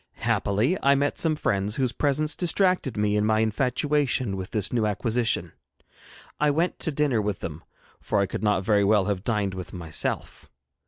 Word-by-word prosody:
Happily 110 - +1
I 140 0 +4
met 140 +1 0
some 160 -2 +2
friends, 100 -6 -1
whose 130 -3 0
presence 150 +3 0
distracted 180 - +1
me 105 0 +1
in 105 - +2
my 110 0 +2
infatuation 130 0 0
with 95 0 -6
this 105 -2 -1
new 115 -3 +1
acquisition. 115 +3 0 0.9
I 150 - +3
went 165 +5 0
to 160 - +1
dinner 140 -6 +1
with 105 -2 -3
them, 80 +1 -6 0.4
for 105 - -1
I 100 - +3
could - - -5
not 105 -3 +1
very 105 -1 +3
well 100 -1 +3
have 100 -2 -2
dined 105 -4 0
with 95 -1 -7
myself. 85 -4 -4
110 Hz, 175 wpm, -25 LUFS, 100-140 Hz, 0.9 s, I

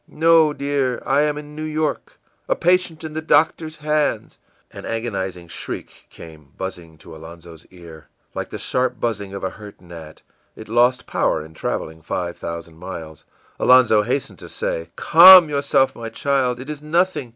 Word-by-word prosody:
î - - -19
ìNo, 160 -2 +4
dear, 140 -3 -1
I 140 +2 +2
am 150 0 0
in 150 0 -10
New 155 - -7
York 155 0 -3 0.3
a - - +2
patient 180 -2 +1
in 155 -1 -7
the 160 - -4
doctor's 160 0 +1
hands.î 150 0 -2 0.4
An - - -9
agonizing 95 -6 -4
shriek - - -8
came 80 -4 -14
buzzing 85 -4 -7
to 80 +1 -13
Alonzo's 80 0 -13
ear, 85 -4 -14 0.3
like - - -5
the - - -6
sharp 125 -2 -2
buzzing 100 -4 -3
of 100 - -7
a 95 - -2
hurt 105 -1 -13
gnat; 85 -3 -13 0.3
it 110 - -11
lost 120 +3 +2
power 75 - -1
in 80 - -15
traveling 80 0 -5
five 85 +2 -4
thousand 85 -1 -8
miles. 80 -4 -9 0.3
Alonzo 125 -4 +5
hastened 125 +6 -3
to - - -11
say: 80 0 -4
ìCalm 180 0 +9
yourself, 140 -2 +1
my 115 -1 -7
child. 125 0 -1
It 130 - -9
is 150 -1 -6
nothing. 155 -3 0
120 Hz, 170 wpm, -20 LUFS, -, 0.4 s, ìCalm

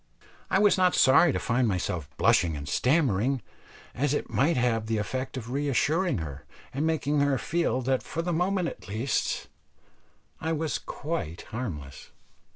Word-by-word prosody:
I - - +3
was 205 -1 +4
not 180 -1 +4
sorry 145 +5 +6
to - - -1
find 120 0 +1
myself 90 -6 -2
blushing 80 -4 +3
and 70 +1 -7
stammering, 130 - +1 0.5
as 145 +3 0
it - - -4
might 155 +3 +2
have 115 -3 +1
the 110 0 0
effect 130 +6 -3
of 120 -1 -6
reassuring 145 +6 +1
her, 70 -4 -6 0.3
and 145 +4 0
making 150 -2 +1
her 140 -1 +2
feel 165 -4 0
that 130 +1 +1
for 165 - -4
the 175 0 -1
moment 180 +1 +1
at - - -8
least 110 +7 -1 0.9
I 160 +1 -1
was 155 0 -1
quite 140 - -5
harmless. 80 - -6
130 Hz, 160 wpm, -27 LUFS, 110-160 Hz, 0.9 s, sorry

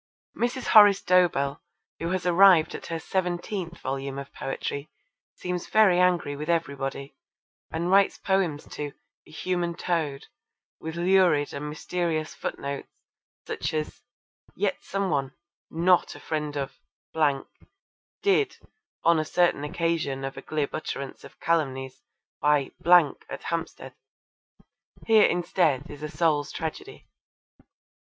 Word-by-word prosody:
Mrs. 245 +2 -2
Horace 205 -3 +7
Dobell, 160 -6 +2 0.4
who 165 - -2
has 185 0 -2
arrived 180 -2 +6
at - - -7
her 165 - -3
seventeenth 175 0 -3
volume 135 +1 -4
of 140 0 -8
poetry, 140 +2 -4 0.5
seems 180 -1 -4
very 205 -5 +5
angry 175 -5 +2
with 150 +3 -6
everybody, 140 -4 -2 0.5
and 170 +3 -2
writes 195 0 +4
poems 185 -7 0
to 145 -1 -5 0.3
A - - -17
Human 175 +1 -2
Toad 160 -6 -2 0.5
with 160 +1 -6
lurid 175 -4 +3
and 150 +1 -4
mysterious 160 0 -2
footnotes 140 0 -5 0.6
such - - -3
as 155 0 -3 0.5
'Yet - - -1
some 195 -2 -2
one, 135 -2 -1 0.3
not 175 +2 +2
a - - -10
friend 150 -2 -3
of 135 -1 -4 1.4
did! 410 +1 +2 0.5
on 170 -1 +4
a - - +1
certain 170 -2 +2
occasion 150 -3 -1
of 135 0 -5
a - - -7
glib 150 -2 -2
utterance 140 -3 -5
of - - -14
calumnies, 135 -5 -1 0.4
by! 145 -1 +2 0.6
at - - -7
Hampstead.' 165 -1 -4 1.1
Here 220 -2 +6
indeed 170 -5 +1
is 145 0 -10
a 150 - -4
Soul's 150 -3 +1
Tragedy. 395 - -6
165 Hz, 125 wpm, -26 LUFS, 145-180 Hz, 1.4 s, Horace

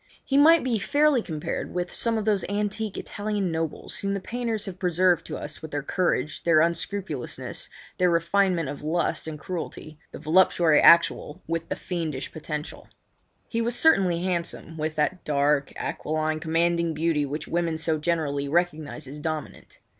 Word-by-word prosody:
He 270 - -1
might 315 +4 +7
be 240 -4 0
fairly 290 +1 +3
compared 155 -3 -4
with 175 0 -2
some 230 -1 +2
of 215 - -2
those 210 -3 +2
antique 205 0 -2
Italian 205 -3 -2
nobles 160 -1 -4
whom 200 0 -1
the - - -2
painters 230 +1 -2
have 185 -2 -7
preserved 180 -1 +2
to - - -4
us - - -6
with 160 - -7
their 145 -1 -3
courage, 155 -3 -1
their 165 -2 +4
unscrupulousness, 170 -3 -2 0.3
their 180 -1 +4
refinement 170 0 +2
of 140 - -6
lust 160 +2 -1
and 155 -1 -5
cruelty—the 155 -2 -7
voluptuary 165 -1 +4
actual 165 -3 +5
with 165 0 -3
the - - -1
fiend 165 -6 -3 0.2
potential. 150 -1 -6 0.6
He 230 - -1
was 235 +1 0
certainly 190 - +3
handsome, 170 -3 -3
with 155 0 -3
that 170 +4 0
dark, 140 -1 +1
aquiline, 155 +1 -2
commanding 170 0 +1
beauty 160 -1 +1
which 145 +2 -4
women 170 -2 -1
so 160 -1 0
generally 150 -4 -1
recognise 155 -3 -1
as 145 +3 -8
dominant. 155 -1 -5
170 Hz, 160 wpm, -26 LUFS, 155-195 Hz, 0.6 s, might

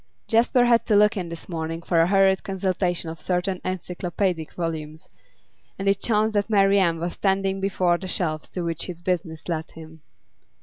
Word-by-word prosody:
Jasper 240 +2 +3
had 235 -1 +4
to 215 - +3
look 210 +2 +5
in 180 -4 -4
this 170 0 -8
morning 165 -1 -4
for 165 -1 +2
a 165 - +3
hurried 195 0 +4
consultation 185 -2 -1
of 160 0 -7
certain 180 +1 -1
encyclopaedic 180 -2 -2
volumes, 160 -2 -5 0.7
and 195 - -4
it 195 0 +3
chanced 220 -1 +2
that 205 +1 0
Marian 195 -5 +3
was 175 +1 -3
standing 195 0 0
before 180 -3 +1
the 190 - -6
shelves 155 -4 -2
to 180 - -4
which 165 -1 -2
his 175 -2 -8
business 170 -3 -3
led 160 -2 -3
him. 160 -1 -13
180 Hz, 175 wpm, -24 LUFS, 165-195 Hz, 0.7 s, look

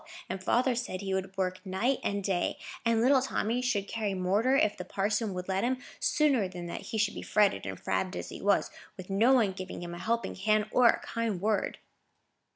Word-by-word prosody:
And 190 +1 -4
father 250 +5 +2
said 235 -6 -3
he 195 -1 -2
would 190 0 -3
work 185 -1 -1
night 210 +8 0
and 200 0 -1
day, 185 -2 0 0.3
and 230 -1 +2
little 265 +1 +5
Tommy 245 -2 -1
should 210 -6 0
carry 210 -4 -2
mortar, 200 +8 +2
if 210 -6 +2
the 180 - -6
parson 205 +3 -1
would 180 0 -5
let 190 0 0
him, 255 +2 +1 0.2
sooner 280 - +2
than 180 -1 -7
that 170 - -5
he 220 - -2
should 210 -1 +1
be - - -6
fretted 210 -2 +2
and - - -5
frabbed 185 0 -1
as - - -5
he - - -8
was, 200 0 +2 0.3
with 185 +1 -8
no 225 +7 +4
one 225 -7 +4
giving 185 -1 -7
him 175 0 -6
a 175 - -7
helping 235 +3 -1
hand 215 +2 +2
or 250 -1 +5
a - - +4
kind 230 -5 -2
word." 210 +2 0
205 Hz, 215 wpm, -30 LUFS, 190-230 Hz, 0.3 s, little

